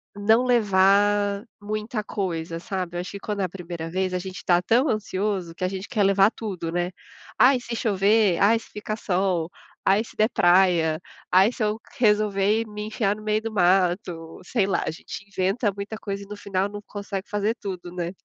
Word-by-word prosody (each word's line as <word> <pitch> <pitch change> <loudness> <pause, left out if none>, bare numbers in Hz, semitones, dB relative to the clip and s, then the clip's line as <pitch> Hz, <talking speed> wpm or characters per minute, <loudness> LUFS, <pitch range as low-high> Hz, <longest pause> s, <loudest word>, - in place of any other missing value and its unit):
não 220 +4 +3
levar 205 -2 +3 0.2
muita 215 +1 -3
coisa, 170 -6 -3
sabe. 180 -1 -4
Eu - - -1
acho 180 - -7
que 200 - -7
quando 205 0 -3
é - - +2
a - - -5
1ª 170 -2 -6
vez, 185 +1 -1
a 180 - 0
gente 190 0 -7
tá 175 -1 +4
tão 240 - +3
ansioso, 195 -4 -2
que - - -6
a - - +2
gente 190 +1 -5
quer 210 - +1
levar 195 +1 +5
tudo, 190 -7 -5
né. 175 +1 -1 0.5
"Ah, 265 +1 +7
e 245 - -2
se 235 -1 -5
chover. 205 -3 +3
Ah, 205 +3 +5
e - - 0
se - - -16
fica 210 0 -4
sol. 180 -5 0 0.3
Ah, 195 +2 +4
e 225 - -2
se - - -15
der 215 +1 +3
praia. 175 -4 +3 0.3
Ah, 185 +2 +6
e 235 - 0
se 230 - -3
eu 210 +1 0
q - - -20
resolver 210 +1 +2
me 210 0 -6
enfiar 215 -2 0
no 215 - -11
meio 215 0 +1
do 225 0 -4
mato", 180 -3 +1
sei 200 0 0
lá, 195 - 0
a - - -1
gente 175 +4 -9
inventa 200 +3 0
muita 200 +2 -5
coisa, 200 -2 -5
e - - -13
no 210 0 -8
final 195 -1 -1
não 205 0 -7
consegue 200 -1 -6
fazer 210 +2 0
tudo, 180 -3 -6
né. 175 -1 -3
200 Hz, 215 wpm, -24 LUFS, 185-215 Hz, 0.5 s, Ah